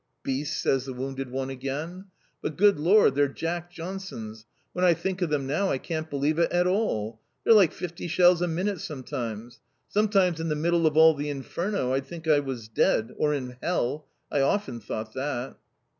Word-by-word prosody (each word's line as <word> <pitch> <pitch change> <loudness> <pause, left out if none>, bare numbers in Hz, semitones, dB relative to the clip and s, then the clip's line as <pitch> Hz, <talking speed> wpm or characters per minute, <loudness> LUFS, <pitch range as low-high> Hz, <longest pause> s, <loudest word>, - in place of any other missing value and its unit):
"Beasts!" 145 +3 -2
says 135 -1 +1
the 130 - -5
wounded 135 +1 -4
one 135 +1 -3
again. 145 +8 -5 0.4
"But 155 - -4
good 200 -3 +5
lor, 185 +3 +5
their 140 +1 +2
Jack 170 +4 -4
Johnsons! 165 - -7 0.3
When 180 - -1
I 175 -2 +5
think 190 +3 -3
of 175 - +1
them 145 -3 0
now 160 +9 0
I - - +1
can't 160 +2 -4
believe 145 +3 0
it 170 - +2
at 175 0 +2
all. 115 - -1 0.2
They're - - +6
like 195 -7 +6
fifty 175 0 -6
shells 175 +1 +4
a 175 - +2
minute 180 +2 -1
sometimes. 120 -5 -6 0.3
Sometimes 195 -5 +2
in 165 0 -2
the 150 - 0
middle 165 +2 +2
of 155 0 0
all 160 0 +8
the 145 0 -4
inferno 145 +1 -2
I'd 135 0 -1
think 170 -1 -8
I 150 -2 +5
was 130 -6 -5
dead; 110 0 +1
or 150 -1 +2
in 125 -3 -5
hell. 150 -4 -1 0.2
I 145 - +2
often 135 - 0
thought 110 0 -6
that." 130 -2 -3
150 Hz, 190 wpm, -27 LUFS, 135-175 Hz, 0.4 s, all